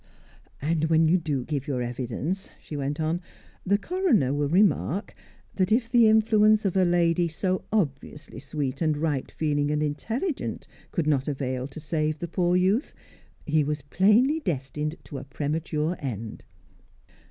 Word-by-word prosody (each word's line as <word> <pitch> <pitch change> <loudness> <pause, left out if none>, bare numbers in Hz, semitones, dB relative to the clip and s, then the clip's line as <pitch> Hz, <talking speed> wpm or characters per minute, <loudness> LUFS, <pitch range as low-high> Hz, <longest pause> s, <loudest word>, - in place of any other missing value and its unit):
"And 160 +1 +1
when 160 0 +4
you 180 +3 +4
give 145 -2 -3
your 130 -4 -1
evidence," 130 - -3
she 150 - -8
went 145 +1 -3
on, 160 +3 0 0.4
"the 200 +2 +3
coroner 245 - +1
will 145 0 0
remark 190 +1 +2 0.4
that 190 +1 0
if 230 +1 +2
the 240 -3 +6
influence 215 -1 +4
of 195 - 0
a 190 -1 +4
lady 175 0 +2
so 185 +3 -2
obviously 150 -6 -2
sweet 140 0 -4
and 155 -2 +1
right 150 -4 -1
feeling 145 -2 0
and 150 0 0
intelligent 230 - -3 0.2
could 170 - -1
not 140 -3 +1
avail 130 -3 -2
to 140 +2 -9
save 155 0 -1
the 170 - -5
poor 175 +1 +1
youth, 190 - +1 0.5
he 155 0 +2
was 150 -1 -3
plainly 215 - +3
destined 150 - -3
to 140 - -7
a - - -8
premature 150 +3 -2
end." 115 -5 -6
155 Hz, 155 wpm, -26 LUFS, 145-190 Hz, 0.5 s, the